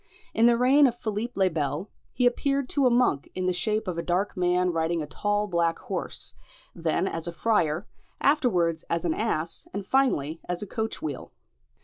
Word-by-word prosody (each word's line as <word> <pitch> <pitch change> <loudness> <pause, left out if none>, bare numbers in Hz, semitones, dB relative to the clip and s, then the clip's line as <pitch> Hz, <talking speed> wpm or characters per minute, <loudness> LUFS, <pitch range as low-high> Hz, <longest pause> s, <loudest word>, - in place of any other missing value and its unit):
In 230 +1 +5
the 235 -1 +4
reign 270 +4 +6
of 240 - -1
Philippe 220 +2 -3
le 190 -1 +3
Bel, 150 +3 -2 0.2
he 250 - +1
appeared 275 +2 +1
to 275 -2 +3
a - - +5
monk 240 - +2
in 185 - -2
the 185 - +2
shape 215 +3 -1
of 175 -2 -2
a - - 0
dark 180 +4 -1
man 180 0 +2
riding 165 0 0
a 155 - -2
tall 205 +7 -1
black 170 -4 +1
horse, - - -5 0.4
then 170 +2 0
as 165 -2 -4
a - - -2
friar, 170 -2 +1 0.3
afterwards 180 - +2
as 170 0 -1
an 165 - +2
ass 170 -7 -2
and 200 -1 -3
finally 165 - +1
as 180 +2 -2
a - - -4
coach 220 +2 -4
wheel. 145 -4 -5
185 Hz, 195 wpm, -26 LUFS, 165-230 Hz, 0.4 s, reign